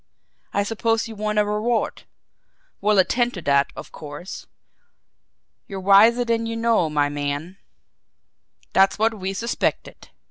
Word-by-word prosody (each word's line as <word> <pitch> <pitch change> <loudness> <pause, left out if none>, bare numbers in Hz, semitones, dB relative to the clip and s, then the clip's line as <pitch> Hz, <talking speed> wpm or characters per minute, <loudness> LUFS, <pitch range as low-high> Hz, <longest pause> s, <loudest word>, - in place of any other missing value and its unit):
I 200 - +1
suppose 225 +2 0
you 225 - -8
want 210 0 -2
a 210 - +4
reward 215 +3 -1 0.8
we'll 210 0 +2
attend 240 +5 +2
to 175 - -6
that, 140 0 +2
of - - -9
course. 150 +5 -9 1.2
You're 195 -1 -6
wiser 210 +6 +5
than 230 -1 0
you 230 - -3
know, 230 -7 +2
my 145 -1 +1
man. 145 +5 -4 1.2
That's 195 0 +4
what 225 +1 +2
we 195 -2 -4
suspected. 230 +4 -3
210 Hz, 135 wpm, -22 LUFS, 180-225 Hz, 1.2 s, wiser